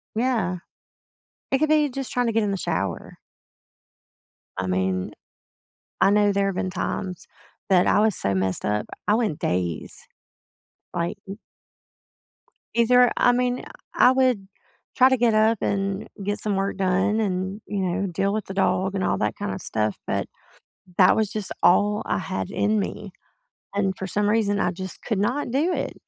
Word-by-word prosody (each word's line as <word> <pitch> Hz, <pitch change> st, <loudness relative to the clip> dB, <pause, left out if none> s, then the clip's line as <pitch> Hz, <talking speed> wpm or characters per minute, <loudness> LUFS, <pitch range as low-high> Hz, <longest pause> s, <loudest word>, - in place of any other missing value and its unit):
Yeah. 220 Hz, -7 st, 0 dB, 0.9 s
It 270 Hz, -, +3 dB
could 310 Hz, +2 st, +1 dB
be 305 Hz, -1 st, +4 dB
just 270 Hz, 0 st, -5 dB
trying 245 Hz, -1 st, +1 dB
to 230 Hz, -, 0 dB
get 225 Hz, 0 st, +2 dB
in 205 Hz, -, 0 dB
the 195 Hz, -, -1 dB
shower. 100 Hz, -, -3 dB, 1.4 s
I 95 Hz, -, -1 dB
mean, 95 Hz, 0 st, -1 dB, 0.9 s
I -, -, +6 dB
know 205 Hz, 0 st, +4 dB
there 200 Hz, 0 st, +1 dB
have 195 Hz, -, -2 dB
been 185 Hz, -, -1 dB
times 185 Hz, -1 st, -4 dB, 0.4 s
that 180 Hz, -2 st, +4 dB
I -, -, +4 dB
was 215 Hz, -2 st, +3 dB
so 100 Hz, -, 0 dB
messed 95 Hz, -1 st, -1 dB
up, 105 Hz, 0 st, 0 dB, 0.2 s
I 210 Hz, -, +4 dB
went 220 Hz, -10 st, -1 dB
days, 90 Hz, -2 st, -3 dB, 0.9 s
like, 170 Hz, 0 st, -2 dB
m 195 Hz, -, -7 dB, 1.4 s
Either 245 Hz, +1 st, +5 dB
I 245 Hz, -, +4 dB
mean, 250 Hz, 0 st, 0 dB, 0.3 s
I -, -, +6 dB
I -, -, +3 dB
would 255 Hz, -7 st, +1 dB, 0.5 s
try 260 Hz, 0 st, +7 dB
to 260 Hz, -, +4 dB
get 235 Hz, -2 st, +2 dB
up 220 Hz, 0 st, +3 dB
and 195 Hz, 0 st, -1 dB, 0.2 s
get 205 Hz, +1 st, -1 dB
some 205 Hz, -2 st, -2 dB
work 195 Hz, 0 st, -1 dB
done 190 Hz, +3 st, +1 dB
and, 190 Hz, 0 st, -2 dB
you 205 Hz, -, -3 dB
know, 190 Hz, +1 st, -1 dB
deal 195 Hz, +2 st, -1 dB
with 215 Hz, 0 st, -2 dB
the 195 Hz, -, -7 dB
dog 190 Hz, 0 st, +1 dB
and 190 Hz, -1 st, -1 dB
all -, -, +1 dB
that -, -, -1 dB
kind 205 Hz, 0 st, -3 dB
of -, -, -5 dB
stuff, 110 Hz, -1 st, -1 dB
but -, -, -1 dB, 0.7 s
that 185 Hz, -, +6 dB
was 220 Hz, -2 st, +1 dB
just 215 Hz, -3 st, -1 dB
all 205 Hz, +4 st, +4 dB
I -, -, 0 dB
had 95 Hz, -, -4 dB
in 215 Hz, +1 st, +1 dB
me, 200 Hz, 0 st, -5 dB, 0.6 s
and 195 Hz, -1 st, +1 dB
for 190 Hz, -, -4 dB
some 205 Hz, +3 st, 0 dB
reason, 205 Hz, -2 st, +1 dB
I 180 Hz, -, +1 dB
just 185 Hz, +1 st, -7 dB
could 220 Hz, -5 st, -2 dB
not 240 Hz, +5 st, -1 dB
do 315 Hz, +7 st, +1 dB
it, -, -, -3 dB
200 Hz, 175 wpm, -24 LUFS, 185-225 Hz, 1.4 s, try